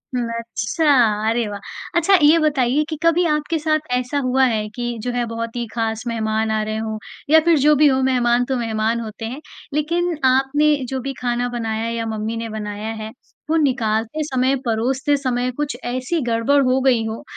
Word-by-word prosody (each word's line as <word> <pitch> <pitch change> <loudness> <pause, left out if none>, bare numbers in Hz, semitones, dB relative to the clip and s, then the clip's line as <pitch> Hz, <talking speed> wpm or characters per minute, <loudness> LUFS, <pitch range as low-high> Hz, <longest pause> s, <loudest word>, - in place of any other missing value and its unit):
हुँ, 245 -1 -1
अच्छा। 230 +6 -2 0.4
अरे 230 0 0
वाह! 205 -1 -6 0.4
अच्छा 360 +3 +3
ये 300 +3 +6
बताइए 285 -2 +2
कि 315 - -3
कभी 335 +1 +3
आपके 300 +1 0
साथ 310 0 0
ऐसा 250 +3 -1
हुआ 260 +1 +2
है 220 -4 0
कि 240 -1 -3
जो 245 - -2
है 245 0 -1
बहुत 230 0 -5
ही 240 -1 -2
खास 225 -1 -2
मेहमान 220 -1 -1
आ 215 0 +1
रहे 215 0 -3
हों 220 0 -3 0.3
या 320 +1 +7
फिर 335 -2 +5
जो 300 +2 +5
भी 300 +1 +5
हो 265 -1 +2
मेहमान 245 -2 +2
तो 265 - -1
मेहमान 225 0 -1
होते 225 0 -7
हैं, 255 +6 -6 0.3
लेकिन 335 +3 0
आपने 270 +4 +3
जो 265 - -2
भी 275 +2 -4
खाना 245 0 0
बनाया 225 -2 -3
या 230 0 -3
मम्मी 220 0 -3
ने 230 0 -4
बनाया 210 0 -5
है, 215 - -5 0.4
वो 320 - +2
निकालते 230 +1 0
समय, 260 -2 +1
परोसते 255 +5 +1
समय 250 -2 -1
कुछ 295 -4 -2
ऐसी 255 +7 -2
गड़बड़ 230 +5 +3
हो 255 +1 +2
गई 250 -4 +3
हो 220 +1 -5
245 Hz, 195 wpm, -20 LUFS, 225-285 Hz, 0.4 s, या